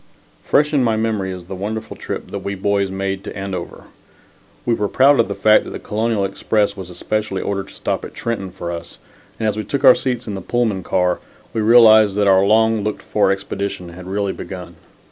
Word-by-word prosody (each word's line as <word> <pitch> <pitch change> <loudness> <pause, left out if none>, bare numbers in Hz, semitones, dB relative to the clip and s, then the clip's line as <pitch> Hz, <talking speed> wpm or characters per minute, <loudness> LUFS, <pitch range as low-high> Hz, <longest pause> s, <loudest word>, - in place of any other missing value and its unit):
Fresh 150 +1 +2
in 140 -3 +3
my 115 -2 +2
memory 110 -4 -1
is 90 -1 -8
the 95 - -8
wonderful 105 +4 -5
trip - - -6
that - - -3
we 100 - -4
boys 100 0 0
made 95 0 -3
to - - -7
Andover. 95 -3 -5 0.8
We 120 - +2
were 105 -2 0
proud 135 +5 +4
of 115 - +4
the 100 - -4
fact 105 +2 +5
that - - -8
the - - -6
Colonial 110 -1 -1
Express 100 +1 0
was 95 -3 -8
especially 100 +2 -2
ordered 100 -1 -3
to - - -15
stop - - -2
at - - -9
Trenton 110 -5 -3
for 85 -1 -6
us, 85 -6 -7 0.4
and 110 - 0
as 105 0 -1
we 110 - -2
took 135 +7 -3
our 130 - +10
seats 125 -2 -2
in 105 - -5
the 95 - -5
Pullman 110 -2 0
car, 90 0 0 0.3
we 110 - 0
realized 110 -2 +6
that 105 0 +2
our 95 -1 +5
long 110 +1 +3
looked 105 0 -3
for 105 -2 +2
expedition 95 -2 -4
had 90 +2 -10
really 100 0 -1
begun. 90 -2 -8
100 Hz, 215 wpm, -19 LUFS, 95-110 Hz, 0.8 s, our